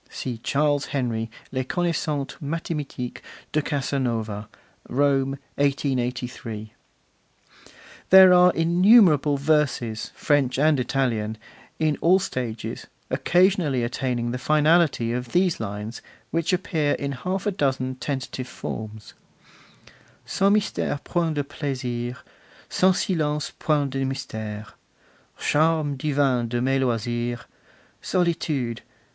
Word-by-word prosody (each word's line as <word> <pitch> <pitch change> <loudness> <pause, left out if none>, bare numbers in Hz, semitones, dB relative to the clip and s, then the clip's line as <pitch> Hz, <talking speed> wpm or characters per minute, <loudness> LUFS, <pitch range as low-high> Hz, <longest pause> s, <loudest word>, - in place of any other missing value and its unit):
[See 120 -3 -5
Charles 145 +3 +1
Henry, 115 -4 -2 0.2
Les 130 0 -1
Connaissances 155 -3 -1
Mathimatiques 150 -4 -4 0.3
de 155 - +1
Casanova. 120 -7 -2 0.4
Rome, 135 0 +1 0.2
1883.] 125 -5 -2 1.4
There 190 -1 +9
are 180 0 +7
innumerable 170 - +5
verses, 140 -7 0
French 140 -4 +1
and 150 0 +3
Italian, 115 -4 -1 0.4
in 155 -2 0
all 180 +3 +5
stages, 125 - -4 0.2
occasionally 175 -8 +2
attaining 120 -1 -2
the 125 - -3
finality 150 -3 +3
of 125 -1 -4
these 180 -1 +2
lines, 105 +1 -5 0.3
which 165 0 0
appear 165 -5 0
in 140 0 -3
half 185 +9 -3
a 205 - +2
dozen 135 -7 -1
tentative 130 -1 -4
forms: 110 -3 -7 1.1
'Sans 195 +1 +2
mystere 205 -8 0
point 165 -3 -1
de 145 - 0
plaisirs, 125 -4 -4 0.5
Sans 185 0 +3
silence 150 -4 -1
point 145 -3 +1
de 135 0 -1
mystere. 110 -5 -4 0.7
Charme 155 -1 +2
divin 135 -4 +1
de 120 +1 -2
mes 135 +2 +1
loisirs, 120 -1 -1 0.6
Solitude! 155 -9 -1
140 Hz, 105 wpm, -24 LUFS, 120-155 Hz, 1.4 s, There